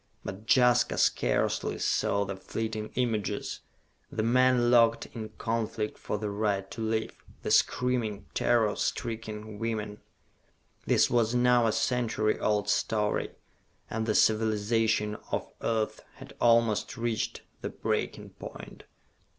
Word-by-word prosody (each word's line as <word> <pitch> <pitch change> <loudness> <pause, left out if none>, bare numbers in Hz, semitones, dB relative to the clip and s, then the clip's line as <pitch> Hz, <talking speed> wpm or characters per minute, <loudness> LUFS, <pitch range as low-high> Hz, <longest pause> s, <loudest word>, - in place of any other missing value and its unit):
But 100 +3 -7
Jaska 125 -2 +3
scarcely - - +1
saw 100 0 +1
the 95 0 -4
fleeting 110 +2 -4
images, 115 -5 -1 0.5
the 110 - -1
men 125 0 +4
locked 115 -1 +4
in 110 -2 -6
conflict 110 -1 -2
for 105 - -4
the 105 0 -3
right 100 -2 -1
to - - -6
live, 110 0 -1 0.3
the - - -2
screaming, 115 -5 +1
terror 110 -4 +2
stricken 110 -2 -4
women. 110 -2 -3 0.9
This - - +4
was 120 -1 +2
now 125 -1 +4
a - - +2
century 115 -1 0
old 105 -1 +1
story, 105 0 0 0.6
and 110 0 -2
the 110 - +1
civilization 110 0 +2
of - - -1
Earth 110 -2 -1
had - - -12
almost 115 0 +3
reached 115 -2 -2 0.2
the - - -3
breaking - - -3
point. - - -10
110 Hz, 125 wpm, -29 LUFS, 105-115 Hz, 0.9 s, men